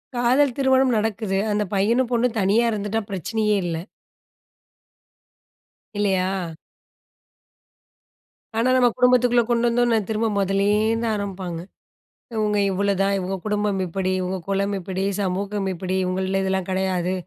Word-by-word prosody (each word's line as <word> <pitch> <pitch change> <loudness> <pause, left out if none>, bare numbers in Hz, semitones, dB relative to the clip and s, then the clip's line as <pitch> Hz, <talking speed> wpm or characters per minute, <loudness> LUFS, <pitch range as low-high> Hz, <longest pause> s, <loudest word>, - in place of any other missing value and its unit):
காதல் 250 +2 +2
திருமணம் 265 -2 +3
நடக்குது. 215 -2 -1
அந்தப் 210 -2 -1
பையனும் 230 +6 +2
பொண்ணும் 240 -1 +1
தனியா 205 +4 +3
இருந்துட்டா, 210 +1 -2
பிரச்சனையே 210 +3 0
இல்ல. 165 -2 -2 2.2
இல்லயா? 190 -3 +1 2.3
ஆனா 240 +3 +2
நம்ம 250 -1 +5
குடும்பத்துக்குள்ள 250 -1 +4
கொண்டு 240 0 +2
வந்தானோன, 235 -1 +2
திரும்ப 220 +1 0
முதல்ல 195 0 +1 0.2
இருந்தா 230 +1 0
ஆரம்பிப்பாங்க. 185 -4 -5 0.7
இவங்க 210 -1 0
இவ்ளோதான். 195 0 +1
இவங்க 190 +1 -3
குடும்பம் 210 -2 0
இப்படி. 185 +2 -2
உங்க 185 +1 -3
குலம் 200 +1 0
இப்படி. 190 0 -4 0.2
சமூகம் 195 +1 -2
இப்படி. 185 +1 -4
இவங்கள்ல 190 +1 -1
இதெல்லாம் 190 -1 -1
கிடையாது. 185 -1 0
200 Hz, 115 wpm, -23 LUFS, 190-230 Hz, 2.3 s, நம்ம